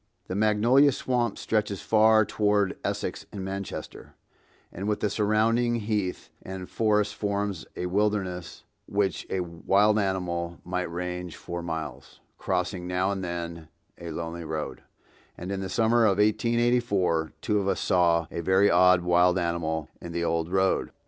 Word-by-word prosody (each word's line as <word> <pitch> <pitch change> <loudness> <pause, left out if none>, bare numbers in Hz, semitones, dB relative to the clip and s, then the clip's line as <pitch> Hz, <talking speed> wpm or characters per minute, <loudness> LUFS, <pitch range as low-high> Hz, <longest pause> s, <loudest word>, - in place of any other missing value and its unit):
The - - -5
Magnolia 110 +7 +4
Swamp 120 -4 -1
stretches 105 -3 -1
far 110 0 +4
toward 105 -2 +1
Essex - - -3
and 95 -2 -6
Manchester, 95 -1 -6 0.6
and 95 +3 -5
with 105 -1 0
the 105 - 0
surrounding 115 +3 +2
heath 105 -4 -2
and 95 -1 -7
forest 105 -2 +1
forms 100 -3 -2
a 90 - -3
wilderness 95 -2 -1 0.2
which 100 -2 -1
a 95 - -1
wild 100 +5 +2
animal 85 -3 -2
might 90 -1 -2
range 90 0 -4
for 85 0 -6
miles, 80 -5 -6 0.2
crossing 90 -1 -2
now 90 +2 0
and 95 -1 -3
then 85 -2 -5 0.3
a 85 - -7
lonely 85 +1 -5
road; 80 -1 -4 0.6
and 90 +3 -6
in 100 - -2
the 95 - -4
summer 115 +3 +3
of 100 -3 +3
1884 110 -6 +1
two 105 -1 0
of 100 - -2
us - - 0
saw 85 -2 +3
a 85 - -3
very 95 +4 +4
odd 90 +1 +5
wild 90 +1 +3
animal 85 -3 -1
in 85 - -7
the 85 0 -1
old 85 0 0
road. 95 0 +1
95 Hz, 150 wpm, -27 LUFS, 85-105 Hz, 0.6 s, odd